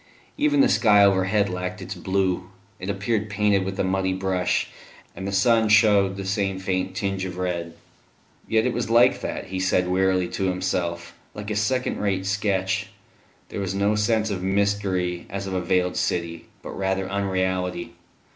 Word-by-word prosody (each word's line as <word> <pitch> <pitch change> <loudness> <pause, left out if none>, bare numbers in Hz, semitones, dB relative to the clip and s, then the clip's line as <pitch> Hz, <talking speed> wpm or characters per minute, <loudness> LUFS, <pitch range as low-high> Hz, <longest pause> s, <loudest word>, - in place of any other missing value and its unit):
Even 290 -1 +3
the 275 - +5
sky 105 - +5
overhead 100 +1 +3
lacked 90 0 -4
its - - -6
blue; 95 -2 -1 0.3
it 95 - -5
appeared 105 +2 -1
painted 105 -1 +2
with 95 0 -5
a - - +2
muddy 95 0 0
brush, 95 -1 0 0.5
and 95 +2 -5
the - - -2
sun 110 +3 +3
shewed 105 -3 +4
the 95 - -5
same 95 0 -1
faint 95 0 -2
tinge 95 -1 -2
of 90 -1 -5
red. 85 -2 -3 0.7
Yes, 110 +1 +2
it 125 - 0
was 115 -1 -2
like 115 +1 +4
that, - - -5
he 95 0 -3
said 90 -1 +1
wearily 95 0 +2
to 95 - -2
himself 90 -2 -2 0.2
like 105 0 -6
a - - -1
second 125 +5 0
rate 95 -2 -1
sketch; 95 -1 0 0.6
there - - -5
was 95 0 -3
no 100 +2 +2
sense 110 0 +1
of 95 -2 -3
mystery 95 -2 0
as 100 0 -4
of 95 - -4
a 90 - 0
veiled 90 0 0
city, 85 -1 -2 0.2
but - - -7
rather 95 -1 -1
unreality. 95 -3 -2
95 Hz, 175 wpm, -24 LUFS, 95-105 Hz, 0.7 s, the